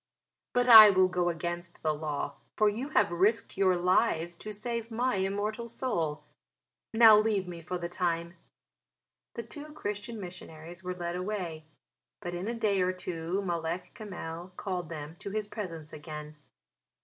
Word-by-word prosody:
But 245 0 +2
I 220 -3 +12
will 185 -1 +5
go 180 -1 0
against 170 +1 -5
the 155 -1 +2
law, 150 -2 -4 0.2
for 215 - +4
you 240 +7 -4
have 205 - +3
risked 195 +6 +2
your 190 -1 +3
lives 175 -2 +2
to 215 - -7
save 230 +2 -4
my 240 0 0
immortal 205 +4 -2
soul. 165 - -2 0.7
Now 225 -2 +8
leave 210 -3 +1
me 170 -1 -7
for 180 +3 -4
the 170 -1 -4
time." 170 -1 -2 1.0
The 235 - -4
two 295 +6 -10
Christian 210 -3 -5
missionaries 175 -2 -9
were 180 0 -3
led 175 -1 -4
away; 180 -5 -4 0.5
but 175 -4 -5
in 175 +3 -4
a 235 - -2
day 205 -4 +1
or 180 0 +2
two 180 +1 -3
Malek 170 -1 -3
Kamel 180 -4 -7
called 180 -4 -3
them 155 0 -7
to - - -6
his 215 +1 -2
presence 175 -8 -7
again. 150 0 -8
185 Hz, 160 wpm, -30 LUFS, 170-215 Hz, 1.0 s, I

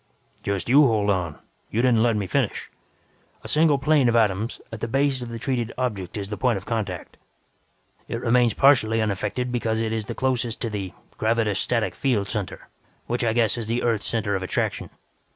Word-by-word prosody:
"Just 100 -4 -2
you 135 +5 +6
hold 105 -3 +2
on. 90 -5 -2 0.3
You 115 +3 0
didn't 120 -3 +4
let 115 -1 +3
me 105 -2 -1
finish. - - -1 0.7
A - - -7
single 155 -2 +3
plane 135 -2 +3
of 120 - +1
atoms, 110 0 +1
at 110 - -6
the - - -3
base 135 +1 +1
of 120 - -6
the 115 - -5
treated 120 -1 -2
object 105 -8 -3
is 100 -1 -4
the 105 - -4
point 120 -4 +1
of 95 - -8
contact. 100 -6 -4 0.9
It 115 - -3
remains 120 -2 +3
partially 125 -5 +4
unaffected 110 +4 -1
because 115 -2 -1
it 110 -1 -1
is 110 -2 -2
closest 125 -1 -1
to 115 - -2
the 95 -4 -4 0.3
'gravetostatic 110 0 +1
field 115 -8 0
center', 105 -4 -4 0.4
which 120 +1 -1
I 110 -1 +2
guess 115 0 +2
is 110 - -4
the 115 +2 -1
Earth's 115 -3 0
center 105 -3 -1
of 95 - -2
attraction. 95 - -2
115 Hz, 190 wpm, -24 LUFS, 105-125 Hz, 0.9 s, you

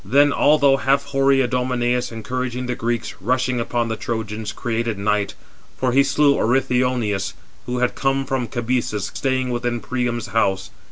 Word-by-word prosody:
Then, 140 +8 +4
although 140 -2 +4
half 140 0 +2
hoary 135 -1 +2
Idomeneus, 125 0 0
encouraging 125 +3 -3
the 125 - -1
Greeks, 120 -1 -2
rushing 125 +3 0
upon 120 0 -1
the 115 - -2
Trojans, 110 -1 -4
created 115 -2 -2
night; 100 -1 0 0.4
for 130 -1 +1
he 135 +3 +5
slew 140 +1 +3
Othryoneus, 125 -5 +1 0.3
who 125 0 -2
had 125 0 +1
come 135 0 0
from 135 -3 -1
Cabesus, 120 -3 -2
staying 130 -2 -1
within 120 0 -1
[Priam's 120 -3 -2
house]. 95 -3 0
125 Hz, 150 wpm, -21 LUFS, 115-130 Hz, 0.4 s, he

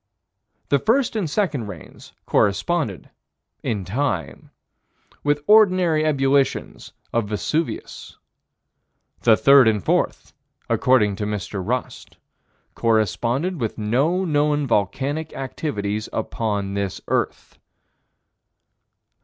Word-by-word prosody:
The 140 - +3
first 235 - +1
and 195 -8 -1
second 150 - -1
rains 90 -7 -11
corresponded, 105 - 0 0.5
in 100 -5 -3
time, 95 - -3 0.7
with 145 0 +1
ordinary 185 -7 +4
ebullitions 140 -2 0 0.2
of 115 -3 0
Vesuvius. 150 +9 -3 1.0
The 110 -2 +5
third 140 -3 +6
and 105 -4 +1
fourth, - - 0 0.3
according 105 -6 +2
to 105 - -3
Mr. 100 -2 -4
Rust, 125 +5 -4 0.6
corresponded 115 - 0
with 115 - -2
no 140 - +1
known 150 -2 +1
volcanic 135 +8 -1
activities 110 -6 -4
upon 105 -3 -2
this 100 -1 -3
earth. - - -2
130 Hz, 95 wpm, -22 LUFS, 105-150 Hz, 1.0 s, third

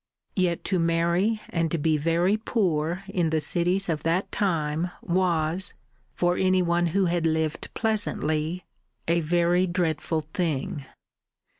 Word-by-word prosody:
Yet 180 -3 0
to 185 - 0
marry 170 +6 +1
and 165 -1 -1
be 155 +1 +2
very 170 +6 +2
poor 185 -6 -1
in 180 -4 0
the 160 0 +1
cities 180 +5 +1
of 160 -3 -1
that 170 +4 0
time 165 -3 0
was 175 0 +1 0.4
for 175 0 +1
any 185 -1 +3
one 175 0 +1
who 190 +4 +1
had 170 -1 +1
lived 160 -1 -1
pleasantly 180 -6 -1 0.4
a 170 +1 +3
very 175 +3 +2
dreadful 165 -2 -1
thing. 150 -4 -2
170 Hz, 130 wpm, -26 LUFS, 160-185 Hz, 0.4 s, any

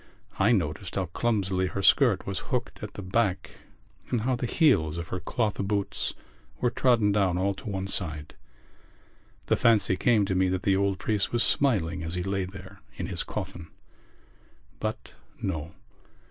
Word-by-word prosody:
I 100 +4 +4
noticed 90 -2 -1
how 95 - 0
clumsily 95 -1 0
her 100 +1 -4
skirt 115 -4 +5
was 100 -1 -2
hooked 125 -4 -2
at 105 - -7
the 100 - -6
back 95 0 0 0.6
and 120 - 0
how 130 +3 +1
the 120 0 -2
heels 100 - +3
of 85 0 -5
her 90 - -3
cloth 105 +4 -1
boots 100 0 -2 0.4
were 125 - +1
trodden 115 -5 +3
down 95 -4 +2
all 100 +2 +1
to 100 +3 -8
one 95 -1 -2
side. 80 -6 -2 1.1
The - - +3
fancy 110 -5 +3
came 110 0 +3
to 95 - -1
me 95 0 +2
that 95 0 -1
the 95 - +3
old 100 0 +1
priest 105 -1 0
was 120 0 +2
smiling 95 -10 +1
as 80 +1 -4
he 90 - -2
lay 95 0 -1
there 95 +1 -11
in - - -4
his - - -3
coffin. 85 -2 -6 1.1
But - - -4 0.3
no. 80 -4 -4
100 Hz, 170 wpm, -27 LUFS, 90-110 Hz, 1.1 s, skirt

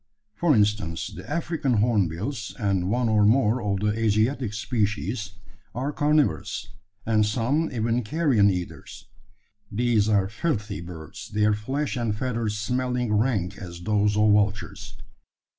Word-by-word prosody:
For 155 +5 +2
instance, 105 -6 0
the - - -10
African 160 -5 -1
hornbills, 105 - 0
and 100 -5 0
one 120 +2 +1
or 105 -1 +3
more 115 +2 +3
of 100 -2 -1
the 105 0 +1
Asiatic 110 +2 +1
species, 105 -2 -2 0.4
are 135 +4 -2
carnivorous, 145 -8 +1 0.4
and 110 -1 +3
some 125 +9 0
even 115 0 0
carrion 120 -5 +3
eaters. 90 -2 -5 0.7
These 110 -1 +2
are 100 -3 +3
filthy 105 - -2
birds, 85 +4 -9
their 105 0 +2
flesh 130 +8 -2
and 115 -3 -1
feathers 115 -4 -2
smelling 125 +1 -1
rank 105 -4 0
as 85 -2 -8
those 105 +1 +1
of 105 0 +5
vultures. 105 0 0
105 Hz, 130 wpm, -25 LUFS, 105-125 Hz, 0.7 s, of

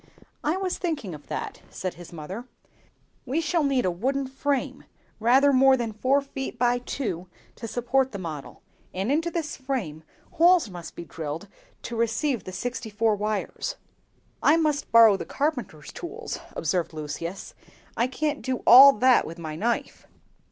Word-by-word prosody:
"I 310 +5 +1
was 380 -1 -2
thinking 290 - -3
of 150 -1 -11
that," - - -5
said 185 -1 -4
his 175 -1 -12
mother; 180 +9 -7 0.8
"we 270 +5 -1
shall 330 0 +1
need 270 -5 +1
a 185 - +2
wooden 265 +10 -1
frame, 270 +1 -2 0.3
rather 265 +5 +5
more 265 0 +6
than 230 -3 -3
four 260 +6 +2
feet 270 -2 -6
by 245 0 +2
two, 200 -8 -4 0.3
to 230 - -6
support 255 +3 0
the 200 - -5
model; 160 -6 -7 0.3
and 195 +7 -1
into 325 +4 +1
this 330 -3 -3
frame 235 - -4 0.3
holes 340 - +4
must 175 -2 -9
be 170 - -7
drilled 160 +3 -6 0.4
to 235 - -5
receive 235 +3 0
the 185 - -6
sixty 240 +4 -4
four 215 +1 +1
wires." 215 - -3 0.7
"I 310 - +5
must 305 -3 0
borrow 225 -3 +7
the - - -6
carpenter's 245 - -3
tools," 345 - -6 0.2
observed 175 -3 -1
Lucius; 155 +4 -6 0.4
"I 240 - +2
can't 295 +3 -2
do 260 -1 -3
all 270 +3 +10
that 255 +3 +4
with 165 - -8
my 160 -2 -6
knife. 230 +8 -2
245 Hz, 160 wpm, -26 LUFS, 190-280 Hz, 0.8 s, all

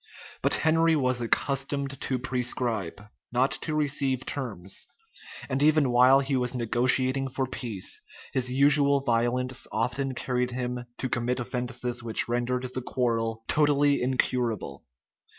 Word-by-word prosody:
But - - +3
Henry 165 +1 +3
was 130 -4 0
accustomed 135 +3 -1
to 130 - -1
prescribe, 120 -7 -2 0.3
not 125 +3 +2
to 155 - -2
receive 140 -3 0
terms; 100 -9 -3 0.6
and 135 0 -1
even 150 -3 +4
while 130 +3 +6
he 135 0 -1
was 125 0 -1
negotiating 130 +3 +1
for 135 0 -2
peace, 115 -6 -4 0.3
his 125 -1 +2
usual 140 +1 +4
violence 125 +1 0
often 130 +4 -1
carried 125 -1 -1
him 125 0 -4
to 130 - -2
commit 125 +1 -1
offences 125 0 -3
which 115 -2 0
rendered 125 +1 -1
the 130 - -3
quarrel 115 -3 -1
totally 145 -1 +3
incurable. 125 - -1
125 Hz, 130 wpm, -27 LUFS, 120-135 Hz, 0.6 s, while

